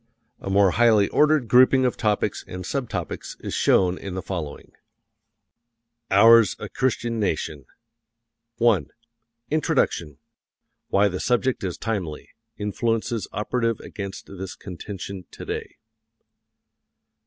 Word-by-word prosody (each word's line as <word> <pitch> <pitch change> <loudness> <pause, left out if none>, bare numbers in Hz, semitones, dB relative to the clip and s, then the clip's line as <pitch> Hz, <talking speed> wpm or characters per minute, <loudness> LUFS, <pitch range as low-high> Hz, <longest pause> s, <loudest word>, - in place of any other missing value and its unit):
A - - -6
more 100 -1 +4
highly 110 -3 +4
ordered 150 -4 +3
grouping 130 +2 +5
of 125 - +1
topics 105 -3 0
and 90 0 -6
subtopics 130 +3 -4
is - - -6
shown 90 -1 +3
in 95 -2 -6
the 95 - -4
following: 85 -7 -6 1.4
OURS 115 +1 +6
A - - -7
CHRISTIAN 120 -3 -1
NATION 80 -8 -2 0.9
I. 115 - +3 0.7
INTRODUCTION: 85 - 0 0.7
Why 100 +1 +3
the 90 -2 -3
subject 125 -1 0
is 90 -3 -3
timely. 95 -9 -4 0.3
Influences 115 +2 -1
operative 115 +2 -1
against 100 -2 -7
this 95 -1 -8
contention 95 0 -8
today. - - -6
105 Hz, 110 wpm, -24 LUFS, 95-120 Hz, 1.4 s, OURS